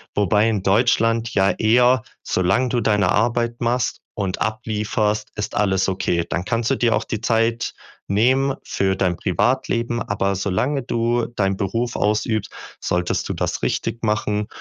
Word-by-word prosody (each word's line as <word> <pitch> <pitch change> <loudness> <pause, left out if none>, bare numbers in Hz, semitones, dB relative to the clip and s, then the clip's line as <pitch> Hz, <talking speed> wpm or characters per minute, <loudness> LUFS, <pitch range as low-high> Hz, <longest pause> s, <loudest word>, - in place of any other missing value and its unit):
Wobei 105 +2 +3
in 105 -4 0
Deutschland 115 +2 +2
ja 95 0 +3
eher 120 +4 +3 0.2
solange 95 +8 +1
du 120 0 0
deine 105 -2 +2
Arbeit 120 0 +1
machst 120 +1 -1
und 95 -3 -2
ablieferst, 105 -1 -1
ist 105 - -4
alles 95 -2 +2
okay. 85 -2 0
Dann 85 - -1
kannst 115 0 0
du 135 - +2
dir 120 -3 +2
auch - - -2
die 110 - -4
Zeit 115 +1 +1 0.4
nehmen 130 +6 +3
für 95 0 0
dein 90 -3 0
Privatleben, 120 +3 0
aber 100 -1 -1
solange 105 +9 0
du 120 0 0
deinen 95 -4 -1
Beruf 115 +5 -2
ausübst, 105 +1 0 0.3
solltest 90 0 -1
du - - -1
das - - -2
richtig 115 - -2
machen 105 -1 0
110 Hz, 150 wpm, -21 LUFS, 100-120 Hz, 0.4 s, Wobei